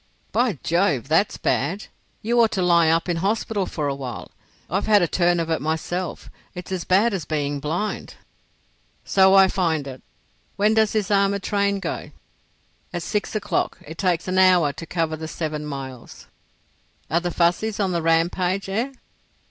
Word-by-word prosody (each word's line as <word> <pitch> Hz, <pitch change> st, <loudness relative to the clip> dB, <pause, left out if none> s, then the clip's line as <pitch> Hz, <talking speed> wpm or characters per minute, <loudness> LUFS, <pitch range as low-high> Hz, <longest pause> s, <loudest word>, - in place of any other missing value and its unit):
"By 240 Hz, -, +1 dB
Jove! 160 Hz, -, +1 dB
that's 165 Hz, +6 st, +2 dB
bad. 180 Hz, +10 st, -1 dB, 0.4 s
You 235 Hz, +2 st, +3 dB
ought 225 Hz, -, +4 dB
to 190 Hz, -, 0 dB
lie 170 Hz, -2 st, +4 dB
up 165 Hz, +2 st, +2 dB
in 175 Hz, -1 st, 0 dB
hospital 205 Hz, +1 st, -1 dB
for 150 Hz, -3 st, -3 dB
a 140 Hz, -, 0 dB
while. 130 Hz, -4 st, -7 dB, 0.4 s
I've 195 Hz, +6 st, -1 dB
had 205 Hz, -3 st, +5 dB
a -, -, +2 dB
turn 175 Hz, +1 st, +2 dB
of 165 Hz, 0 st, -2 dB
it 160 Hz, -, 0 dB
myself. 160 Hz, +4 st, -3 dB, 0.3 s
It's 180 Hz, +1 st, -8 dB
as 185 Hz, -3 st, -3 dB
bad 205 Hz, +5 st, +3 dB
as 185 Hz, -5 st, -2 dB
being 145 Hz, -1 st, -2 dB
blind." 165 Hz, +9 st, -3 dB, 0.9 s
"So 190 Hz, 0 st, +5 dB
I 195 Hz, -1 st, +7 dB
find 165 Hz, -6 st, 0 dB
it. 130 Hz, -2 st, -8 dB, 0.5 s
When 210 Hz, +2 st, +3 dB
does 220 Hz, -1 st, +2 dB
this 210 Hz, -1 st, -1 dB
armoured 200 Hz, -1 st, +2 dB
train 200 Hz, -1 st, 0 dB
go?" -, -, -5 dB, 0.8 s
"At 175 Hz, -2 st, -4 dB
six 210 Hz, +4 st, -2 dB
o'clock. 205 Hz, -1 st, -1 dB
It 160 Hz, +2 st, -10 dB
takes 180 Hz, -2 st, 0 dB
an 185 Hz, 0 st, +1 dB
hour 180 Hz, -6 st, +5 dB
to 165 Hz, -, -9 dB
cover 165 Hz, -2 st, -1 dB
the 160 Hz, 0 st, -7 dB
seven 155 Hz, -2 st, -4 dB
miles." 135 Hz, -4 st, -8 dB, 0.9 s
"Are 165 Hz, -, +3 dB
the 175 Hz, 0 st, -3 dB
Fuzzies 180 Hz, +6 st, 0 dB
on 195 Hz, -2 st, +1 dB
the 170 Hz, -1 st, 0 dB
rampage—eh?" 185 Hz, +8 st, 0 dB
180 Hz, 170 wpm, -23 LUFS, 160-200 Hz, 0.9 s, I